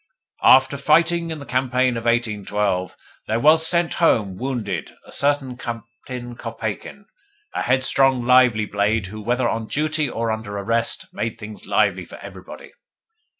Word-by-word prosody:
"After 135 +2 +5
fighting 165 +4 +2
in 160 - -4
the 140 - -9
campaign 125 0 0
of 115 0 -5
1812, 105 -5 -1 0.3
there 110 +1 0
was 160 +4 +5
sent 170 -1 +1
home, 105 - +2
wounded, 110 - -4
a - - -15
certain 140 -3 0
Captain 120 +1 -8
Kopeikin 115 - -6 0.5
a - - -2
headstrong, 130 0 +2
lively 125 -4 +4
blade 105 +1 0
who, 105 +3 -8
whether 120 +3 0
on 115 -1 -3
duty 155 +1 0
or 115 -1 -2
under 110 -2 -5
arrest, 115 +3 0
made 115 +2 -3
things 105 -2 -10
lively - - +1
for - - -12
everybody. - - -11
120 Hz, 145 wpm, -21 LUFS, 110-135 Hz, 0.5 s, After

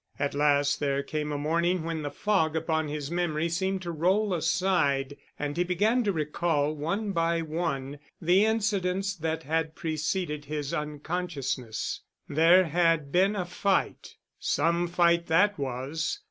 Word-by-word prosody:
At 145 - -1
last 145 0 +2
there 140 -1 0
came 150 +1 -3
a 145 - -2
morning 170 +4 0
when 165 -1 -3
the 145 - -3
fog 165 -4 0
upon 160 -1 0
his 150 0 -4
memory 170 -2 0
seemed 190 +2 -1
to 170 - -3
roll 185 +5 +1
aside 155 -5 +1 0.2
and 145 0 -3
he 175 - +2
began 210 +8 +2
to 205 - +2
recall 155 -2 0
one 195 +8 -2
by 165 -1 +1
one 150 -4 -3 0.2
the 180 +4 +4
incidents 200 -3 0
that 160 0 -2
had 160 +1 -1
preceded 155 -1 -2
his 150 0 -4
unconsciousness. 150 -6 -3 0.3
There 165 +5 +5
had 165 -3 +1
been 195 +5 +3
a 185 -3 -2
fight. 190 +2 -1 0.2
Some 170 +1 +1
fight 170 0 +2
that 185 +3 +3
was. 140 - -3
165 Hz, 145 wpm, -28 LUFS, 150-180 Hz, 0.3 s, There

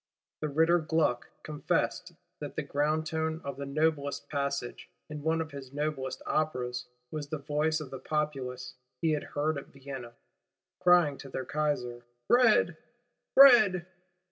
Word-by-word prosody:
The 155 - -2
Ritter 165 +4 +4
Gluck 155 -6 0
confessed 150 -1 -1 0.3
that - - -7
the - - -2
ground 155 +2 0
tone 160 0 -2
of 140 -1 -5
the 140 0 -5
noblest 145 -1 0
passage, 140 -3 -3 0.2
in 150 -1 -5
one 160 +2 +1
of 160 -1 -5
his 135 -2 -9
noblest 140 -3 -3
Operas, 125 -5 -1 0.2
was 150 -2 -4
the 155 - -3
voice 150 +2 0
of 150 -4 -8
the 135 - -6
Populace 130 -4 -3 0.3
he 165 -2 +1
had 150 -1 0
heard 150 0 -1
at - - -12
Vienna, 135 -3 -9 0.6
crying 175 -6 +4
to 135 - -9
their 130 0 -4
Kaiser: 125 -5 -2 0.2
Bread! 230 -9 +4 0.6
Bread! 215 -10 +8
150 Hz, 145 wpm, -30 LUFS, 135-160 Hz, 0.6 s, Bread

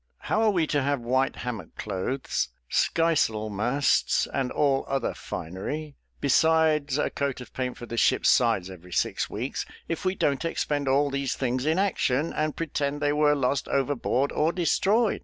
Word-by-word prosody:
"How 220 - 0
are 220 - +4
we 175 -6 +2
to 145 -1 0
have 140 -1 0
white 130 +3 +1
hammock 125 -4 -6
clothes, 105 - -2 0.2
sky 165 0 +2
sail 110 -7 0
masts, 120 +8 +1
and 135 -2 -1
all 140 -2 +2
other 135 0 -1
finery, 140 - -5 0.2
besides 155 -1 +3
a 150 - 0
coat 140 -2 -2
of 125 - -11
paint 125 -1 -3
for 120 - -8
the 115 0 -6
ship's - - +3
sides 110 -7 +3
every 90 -1 -11
six - - 0
weeks, - - -3 0.2
if 165 - -3
we 185 0 0
don't 140 -3 0
expend 145 -4 -1
all 140 +2 +2
these 140 -1 -1
things 130 +1 -1
in 160 +2 +2
action, 165 -6 +1
and 155 0 -1
pretend 145 -3 -2
they 145 0 +1
were 150 0 +3
lost 135 -1 0
overboard, 140 0 0
or 155 +2 +1
destroyed? 200 +6 +2
140 Hz, 175 wpm, -26 LUFS, 125-155 Hz, 0.2 s, are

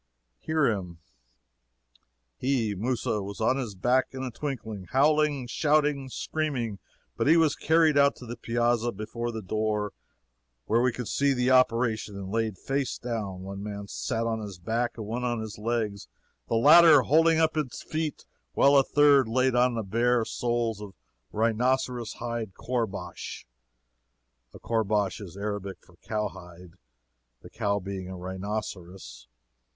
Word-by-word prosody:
Hear 155 -2 +1
him: 95 -8 -2 1.4
"He 125 - 0
(Mousa) 110 0 -1
was 100 +1 -7
on 115 +4 +2
his 120 -7 -4
back 125 +7 +2
in 130 0 -5
a 130 - -4
twinkling, 110 -7 -5
howling, 145 - +2
shouting, 145 +1 +1
screaming, 130 -9 -3 0.4
but - - 0
he 165 +3 +6
was 160 -3 +3
carried 160 -2 +3
out 140 0 +4
to 125 - -11
the 120 0 -6
piazza 120 0 0
before 115 +3 -5
the 110 -2 -6
door, 105 +1 -1 0.7
where 115 +2 +2
we 125 0 +3
could 125 -1 -6
see 140 0 +2
the 125 0 +1
operation, 115 -4 +2
and 95 -1 -6
laid 110 -3 -1
face 135 +5 -2
down. 105 -6 -4
One 100 +1 -7
man 100 0 -6
sat 115 +1 -2
on 115 -1 -1
his 100 -3 -7
back 115 +7 -2
and 110 - -5
one 115 +4 -3
on 120 -2 -1
his 110 -1 -7
legs, 110 -3 -2 0.4
the - - 0
latter 150 +4 +8
holding 160 +3 +4
up 160 0 +3
his 150 -6 -3
feet, 155 -1 -3 0.3
while 140 +1 +5
a 135 - +6
third 140 -3 +4
laid 130 +3 +2
on 125 0 +3
the 115 - -2
bare 115 +3 +1
soles 120 -3 -1
a 105 - -6 0.4
rhinoceros 120 +1 0
hide 115 -4 -5
koorbash 115 -5 -4 1.1
["A - - -12
Koorbash 105 -3 0
is 95 -2 -9
Arabic 100 -1 -4
for 90 - -20
cowhide, 90 -5 -6 0.7
the - - -12
cow 105 -2 0
being 95 -1 -6
a 95 - -7
rhinoceros. 95 - -6
115 Hz, 150 wpm, -27 LUFS, 105-130 Hz, 1.4 s, latter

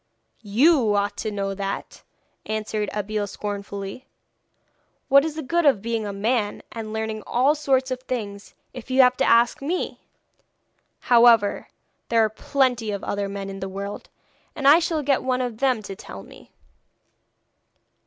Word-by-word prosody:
'You 230 +1 +3
ought 205 0 0
to 220 - -3
know 200 -1 -3
that,' 195 0 -5 0.5
answered 215 -1 -2
Abeille 210 0 -2
scornfully. 200 +3 -6 1.0
'What 275 +1 +7
is 315 -1 -3
the 315 - -4
good 340 +6 +1
of 265 -9 +3
being 230 -2 -2
a - - -3
man, 210 +1 -1
and 220 -1 -6
learning 220 0 -3
all 260 +5 +3
sorts 265 -3 0
of 255 0 -3
things, 210 -6 -6 0.2
if 250 0 -10
you 260 +1 +5
have 250 0 +4
to - - +1
ask 235 +2 +3
me. 330 +6 -3 1.0
However, 235 -4 +4 0.4
there 230 -1 +4
are - - -1
plenty 245 0 0
of 200 -2 -4
other 200 -1 -2
men 200 0 -5
in 195 0 -7
the 190 - -5
world, 200 +1 -6 0.5
and 275 - 0
I 300 +4 +8
shall 325 -3 -1
get 275 -1 +2
one 255 -1 0
of 245 -3 -3
them 255 -5 +1
to 195 - -7
tell 100 - -10
me.' - - -16
225 Hz, 160 wpm, -23 LUFS, 205-260 Hz, 1.0 s, I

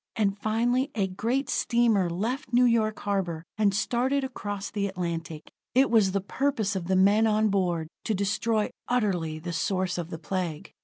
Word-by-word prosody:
And 200 -3 +1
finally, 235 +5 0
a 200 -4 +1
great 230 +9 -1
steamer 230 -6 +2
left 235 - -3
New 245 +1 +5
York 220 -3 +2
harbor, 180 -5 -2
and 210 -2 +3
started 250 +7 0
across 205 -6 -5
the 200 -1 -1
Atlantic. 170 -4 -5 0.2
It 265 0 +4
was 215 -5 +4
the 200 0 0
purpose 220 -2 -1
of 175 -3 -3
the 190 - +2
men 205 +4 +5
on 215 0 +2
board 175 -5 0 0.2
to 220 - 0
destroy 210 +2 0 0.2
utterly 185 -10 0
the 170 +2 -5
source 185 +1 -1
of 170 -1 -5
the 165 - -5
Plague. 165 -1 -4
200 Hz, 170 wpm, -27 LUFS, 185-230 Hz, 0.2 s, New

